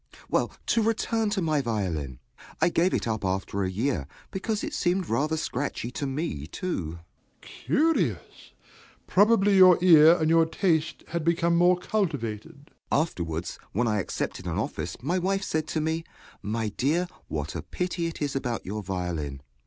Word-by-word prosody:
Well, -, -, +1 dB
to 230 Hz, -, +2 dB
return 225 Hz, 0 st, 0 dB
to 200 Hz, -3 st, -1 dB
my 155 Hz, -3 st, +1 dB
violin. 90 Hz, -, -2 dB, 0.4 s
I -, -, +4 dB
gave 175 Hz, +2 st, +2 dB
it -, -, -1 dB
up 110 Hz, -2 st, -2 dB
after 95 Hz, +1 st, -1 dB
a 95 Hz, -, 0 dB
year, 105 Hz, -, -1 dB, 0.2 s
because 210 Hz, +2 st, -2 dB
it 315 Hz, -, -4 dB
seemed 185 Hz, -, 0 dB
rather 150 Hz, +7 st, 0 dB
scratchy 140 Hz, -4 st, -3 dB
to 140 Hz, +3 st, -3 dB
me, 135 Hz, -, -3 dB
too. 85 Hz, -, -4 dB
DOMINIE. 85 Hz, -, -17 dB, 0.4 s
Curious! 170 Hz, -, -1 dB, 0.5 s
Probably 205 Hz, 0 st, +4 dB
your 185 Hz, -2 st, +8 dB
ear 165 Hz, -2 st, +7 dB
and 155 Hz, -, +1 dB
your 165 Hz, 0 st, +4 dB
taste 165 Hz, -2 st, 0 dB
had 170 Hz, -2 st, -2 dB
become 170 Hz, +1 st, +2 dB
more 175 Hz, +1 st, +5 dB
cultivated. 145 Hz, -, -3 dB, 0.2 s
JOHN -, -, +4 dB
S. -, -, +5 dB
Afterwards, 85 Hz, -, -5 dB
when 120 Hz, +4 st, +1 dB
I 105 Hz, -1 st, +1 dB
accepted 95 Hz, -, -4 dB
an -, -, -2 dB
office, -, -, -3 dB
my 175 Hz, +7 st, +1 dB
wife 195 Hz, +2 st, 0 dB
said 155 Hz, -4 st, -1 dB
to 160 Hz, -, -1 dB
me, 160 Hz, +1 st, -1 dB, 0.4 s
"My 110 Hz, +1 st, -2 dB
dear, 155 Hz, -, 0 dB, 0.2 s
what 75 Hz, +1 st, -4 dB
a -, -, -3 dB
pity 180 Hz, -2 st, -3 dB
it 165 Hz, -2 st, -5 dB
is 140 Hz, -2 st, -2 dB
about 125 Hz, -4 st, -2 dB
your 105 Hz, +3 st, -4 dB
violin." 90 Hz, -8 st, -4 dB
155 Hz, 170 wpm, -27 LUFS, 105-180 Hz, 0.5 s, your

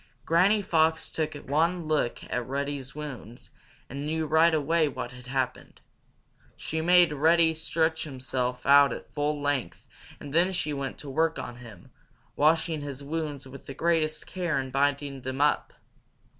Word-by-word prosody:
Granny 195 Hz, +6 st, +3 dB
Fox 160 Hz, -3 st, +2 dB
took 155 Hz, -2 st, -2 dB
one 160 Hz, +5 st, 0 dB
look 155 Hz, -6 st, 0 dB
at 125 Hz, -1 st, -3 dB
Reddy's 140 Hz, 0 st, -4 dB
wounds, 125 Hz, -6 st, -8 dB, 0.4 s
and 140 Hz, +2 st, -6 dB
knew 160 Hz, +1 st, -1 dB
right 160 Hz, +3 st, +4 dB
away 155 Hz, +1 st, +2 dB
what 130 Hz, -3 st, -5 dB
had 125 Hz, 0 st, -12 dB
happened. 130 Hz, -1 st, -3 dB, 0.8 s
She 160 Hz, 0 st, -3 dB
made 175 Hz, -1 st, +5 dB
Reddy 160 Hz, +3 st, +4 dB
stretch 160 Hz, 0 st, 0 dB
himself 125 Hz, -3 st, -3 dB
out 140 Hz, 0 st, +7 dB
at -, -, -10 dB
full 145 Hz, 0 st, -1 dB
length 145 Hz, -3 st, -2 dB, 0.3 s
and 140 Hz, -1 st, -9 dB
then 175 Hz, +4 st, +3 dB
she 155 Hz, -4 st, -2 dB
went 140 Hz, -2 st, -4 dB
to 145 Hz, -, -9 dB
work 160 Hz, +3 st, +1 dB
on 120 Hz, -, -6 dB
him, 115 Hz, -7 st, -13 dB, 0.4 s
washing 160 Hz, +1 st, +2 dB
his 140 Hz, -1 st, -6 dB
wounds 150 Hz, -2 st, -4 dB
with 135 Hz, +1 st, -12 dB
the 135 Hz, -, -7 dB
greatest 160 Hz, -1 st, 0 dB
care 175 Hz, -4 st, -2 dB
and 130 Hz, -1 st, -3 dB
binding 140 Hz, 0 st, 0 dB
them 130 Hz, +1 st, -5 dB
up. 145 Hz, 0 st, +2 dB
145 Hz, 155 wpm, -27 LUFS, 135-160 Hz, 0.8 s, out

